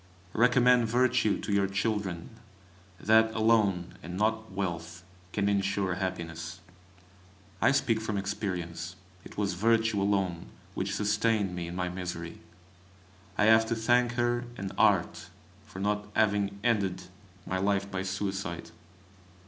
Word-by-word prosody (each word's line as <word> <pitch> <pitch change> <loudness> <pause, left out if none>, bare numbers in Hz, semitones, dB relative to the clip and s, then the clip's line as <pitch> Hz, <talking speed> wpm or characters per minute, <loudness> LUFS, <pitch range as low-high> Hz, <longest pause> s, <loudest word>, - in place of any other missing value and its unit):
Recommend 125 0 +4
Virtue 120 -2 +2
to 105 - -2
your 100 -1 +3
children; 100 -3 -2 0.7
that 110 +1 +4
alone, 110 -6 +2
and 90 +1 -6
not 110 +1 0
wealth, 85 -3 -4 0.3
can 100 0 0
ensure 100 -1 +1
happiness. 85 -2 -4 1.0
I - - +5
speak 115 -5 +1
from 110 -2 -2
experience. 90 -3 -4 0.3
It - - -13
was 100 -3 0
Virtue 110 +2 +2
alone 95 -4 0 0.3
which 100 +1 -2
sustained 105 -2 +1
me 85 -1 -4
in 85 - -6
my 90 0 -1
misery; 90 -2 -5 1.0
I - - +3
have 110 +1 +6
to 115 - 0
thank 120 +2 +2
her 120 0 0
and 95 -1 -4
Art - - +2 0.4
for - - -11
not 105 +1 -1
having 100 -2 +2
ended 100 -6 +1 0.4
my 95 - -2
life 100 0 0
by 95 -2 -2
suicide. 95 -3 -4
100 Hz, 130 wpm, -29 LUFS, 90-110 Hz, 1.0 s, have